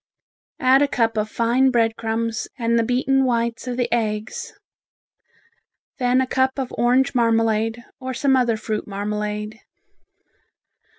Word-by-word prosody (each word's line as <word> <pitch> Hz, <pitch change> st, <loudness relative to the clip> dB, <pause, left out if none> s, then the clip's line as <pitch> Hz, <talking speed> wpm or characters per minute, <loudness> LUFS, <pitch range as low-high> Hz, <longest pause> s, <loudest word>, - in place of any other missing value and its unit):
Add 265 Hz, -1 st, +5 dB
a 290 Hz, -, +4 dB
cup 230 Hz, -5 st, 0 dB
of 215 Hz, 0 st, -1 dB
fine 240 Hz, +4 st, +2 dB
bread 230 Hz, -3 st, +2 dB
crumbs 225 Hz, 0 st, -2 dB
and 235 Hz, -1 st, +1 dB
the -, -, +2 dB
beaten 260 Hz, +3 st, +1 dB
whites 235 Hz, -1 st, -1 dB
of 245 Hz, -1 st, -3 dB
the 245 Hz, -1 st, +1 dB
eggs; 215 Hz, -2 st, -2 dB, 1.5 s
then 250 Hz, 0 st, +3 dB
a -, -, +1 dB
cup 260 Hz, +1 st, 0 dB
of 265 Hz, -2 st, -4 dB
orange 250 Hz, +3 st, +2 dB
marmalade, 225 Hz, -1 st, +1 dB
or 260 Hz, 0 st, -5 dB
some 265 Hz, +1 st, +2 dB
other 240 Hz, -3 st, +2 dB
fruit 215 Hz, 0 st, -4 dB
marmalade. 210 Hz, +1 st, -4 dB
235 Hz, 135 wpm, -22 LUFS, 220-255 Hz, 1.5 s, Add